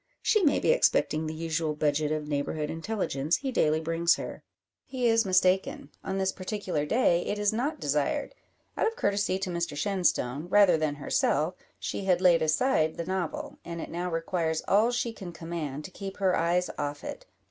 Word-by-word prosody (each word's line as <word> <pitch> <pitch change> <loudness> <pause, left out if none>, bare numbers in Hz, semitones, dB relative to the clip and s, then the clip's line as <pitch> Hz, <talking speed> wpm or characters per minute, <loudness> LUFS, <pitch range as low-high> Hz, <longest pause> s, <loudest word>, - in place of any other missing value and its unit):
She 430 - +3
may 295 - +4
be - - +3
expecting 160 - +2
the 155 - -4
usual 160 -1 -2
budget 150 0 +1
of 155 -1 -2
neighbourhood 150 +1 -2
intelligence 165 -4 -1
he 270 -1 -3
daily 155 -9 +2
brings 165 +1 +2
her. - - -7 0.4
He 255 -2 -1
is 225 -2 +3
mistaken. 185 0 +2
On 190 - -3
this 190 0 +1
particular 185 -6 -3
day 175 -5 +3
it 205 - -1
is 205 0 +1
not 260 +8 -1
desired. 145 - -1 0.4
Out - - +1
of 455 - -2
courtesy 200 - 0
to 190 -1 -3
Mr 170 -3 -3
Shenstone, 170 -6 0
rather 195 -2 +5
than 155 -2 -1
herself, 145 - +1 0.2
she 195 - -4
had 180 -2 +3
laid 180 -2 +5
aside 160 - +2
the 170 - -3
novel; 190 - -3
and 170 0 -6
it - - -6
now 175 +2 -3
requires 165 -1 -1
all 215 +4 +4
she 240 -1 -1
can 190 -5 -8
command 160 -3 -5
to 185 - -9
keep 195 +1 -7
her 190 -2 +2
eyes 175 +2 +1
off 145 0 -3
it. - - -7
175 Hz, 185 wpm, -28 LUFS, 155-200 Hz, 0.4 s, rather